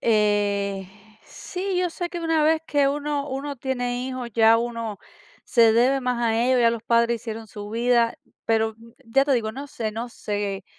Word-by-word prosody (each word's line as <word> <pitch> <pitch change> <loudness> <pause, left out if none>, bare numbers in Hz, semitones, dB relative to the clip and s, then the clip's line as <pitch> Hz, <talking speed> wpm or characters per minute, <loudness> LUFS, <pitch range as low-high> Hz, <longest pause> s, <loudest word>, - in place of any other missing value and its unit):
Eh, 205 -3 +1 0.4
sí, 370 0 -4
yo 360 -1 0
sé 350 +1 -4
que 345 - -5
una 325 -2 +1
vez 315 +1 +3
que 290 -3 +2
uno 290 0 -2
uno 280 +2 -4
tiene 245 -1 -2
hijos, 255 -2 -5
ya 225 0 +6
uno 230 -3 -4 0.5
se 230 -2 +5
debe 255 +4 +3
más 250 -2 -1
a 225 -1 +2
ellos, 255 0 +3
ya 230 -1 +5
los 230 -1 -4
padres 235 0 +2
hicieron 225 -1 -6
su 205 0 -9
vida, 235 0 +2 0.3
pero, 220 -1 +1 0.3
ya 270 +4 +3
te 280 - +1
digo, 220 -4 0
no 275 +4 -7
sé, 225 -6 -4
no 230 +3 -4
sé 205 -3 -4
235 Hz, 185 wpm, -24 LUFS, 220-275 Hz, 0.5 s, ya